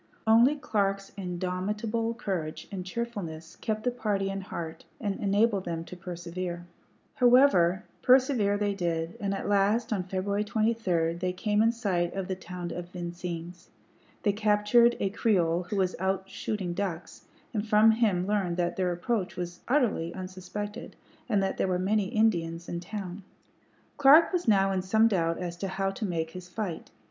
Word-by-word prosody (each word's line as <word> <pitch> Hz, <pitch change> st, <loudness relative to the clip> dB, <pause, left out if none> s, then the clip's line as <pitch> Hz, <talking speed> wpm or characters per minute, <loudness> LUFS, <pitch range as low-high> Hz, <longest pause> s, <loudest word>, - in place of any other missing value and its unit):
Only 230 Hz, +6 st, +6 dB
Clark's 195 Hz, -7 st, -1 dB
indomitable 205 Hz, +5 st, -2 dB
courage 180 Hz, -9 st, -4 dB
and 190 Hz, -2 st, -4 dB
cheerfulness 185 Hz, -6 st, -5 dB
kept 215 Hz, -1 st, -3 dB
the 250 Hz, -, +1 dB
party 205 Hz, -5 st, -1 dB
in 195 Hz, 0 st, -4 dB
heart 165 Hz, -3 st, -6 dB, 0.2 s
and 205 Hz, -3 st, -2 dB
enabled 205 Hz, 0 st, +2 dB
them 165 Hz, -1 st, -3 dB
to 180 Hz, -, -9 dB
persevere. 175 Hz, 0 st, -5 dB, 0.5 s
However, 240 Hz, -8 st, +5 dB, 0.2 s
persevere 255 Hz, -6 st, +4 dB
they 205 Hz, -1 st, 0 dB
did, 170 Hz, -3 st, -2 dB
and 200 Hz, -1 st, -1 dB
at 195 Hz, -, -3 dB
last, 205 Hz, +3 st, +2 dB
on 200 Hz, -, 0 dB
February 190 Hz, +3 st, -1 dB
23, 210 Hz, -7 st, +1 dB
they 180 Hz, +1 st, -1 dB
came 210 Hz, +3 st, +1 dB
in 225 Hz, +1 st, +4 dB
sight 185 Hz, -7 st, -1 dB
of 195 Hz, -2 st, -3 dB
the 190 Hz, -, -1 dB
town 180 Hz, -1 st, -7 dB
of 175 Hz, 0 st, -6 dB
Vincennes. 175 Hz, 0 st, -6 dB, 0.5 s
They 205 Hz, -, +3 dB
captured 215 Hz, +3 st, +4 dB
a 195 Hz, -, 0 dB
Creole 180 Hz, -5 st, +1 dB
who -, -, -2 dB
was 185 Hz, -2 st, +1 dB
out 190 Hz, +1 st, -1 dB
shooting 195 Hz, -2 st, -3 dB
ducks, 175 Hz, -4 st, -5 dB, 0.3 s
and 215 Hz, 0 st, -2 dB
from 215 Hz, +1 st, +6 dB
him 210 Hz, -6 st, +2 dB
learned 195 Hz, -4 st, 0 dB
that 175 Hz, -1 st, -1 dB
their 185 Hz, -2 st, +1 dB
approach 185 Hz, +3 st, -2 dB
was 175 Hz, 0 st, -5 dB
utterly 235 Hz, -, +1 dB
unsuspected, 185 Hz, +3 st, -6 dB, 0.3 s
and 205 Hz, -4 st, +2 dB
that 195 Hz, -, -1 dB
there -, -, +1 dB
were 180 Hz, -1 st, +1 dB
many 200 Hz, +3 st, +1 dB
Indians 175 Hz, -6 st, 0 dB
in 170 Hz, -, -3 dB
town. 190 Hz, +1 st, -6 dB, 0.8 s
Clark 290 Hz, +6 st, +7 dB
was 360 Hz, -5 st, -1 dB
now 195 Hz, -2 st, +4 dB
in 190 Hz, -1 st, 0 dB
some 220 Hz, +5 st, +4 dB
doubt 165 Hz, -6 st, +1 dB
as 175 Hz, -1 st, -4 dB
to 195 Hz, -, -3 dB
how 195 Hz, +1 st, -1 dB
to 210 Hz, -, -4 dB
make 165 Hz, -4 st, -2 dB
his 180 Hz, 0 st, -9 dB
fight. 180 Hz, -4 st, -4 dB
195 Hz, 165 wpm, -28 LUFS, 175-215 Hz, 0.8 s, Clark